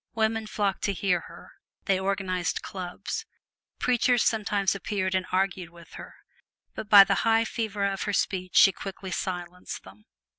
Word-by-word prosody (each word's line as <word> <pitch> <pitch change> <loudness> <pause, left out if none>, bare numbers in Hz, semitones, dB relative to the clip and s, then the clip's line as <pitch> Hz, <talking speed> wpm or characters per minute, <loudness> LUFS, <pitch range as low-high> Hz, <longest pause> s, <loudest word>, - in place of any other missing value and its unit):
Women 220 0 0
flocked 205 -2 -1
to 200 - 0
hear 185 -2 +1
her, - - -14 0.3
they 195 -2 +2
organized 190 -2 -2
clubs. 195 - -6 0.5
Preachers 245 -1 +2
sometimes 205 -3 +1
appeared 195 -1 -2
and 185 0 0
argued 190 -2 -1
with 170 -1 -16
her, - - -10 0.6
but 210 - -7
by 205 -2 +10
the 195 0 0
high 225 0 +3
fervor 210 -3 -2
of 195 -1 -2
her - - -1
speech 185 -2 -1
she 195 - +8
quickly 195 0 -8
silenced 180 0 -5
them. 95 +3 -16
195 Hz, 155 wpm, -27 LUFS, 185-210 Hz, 0.6 s, by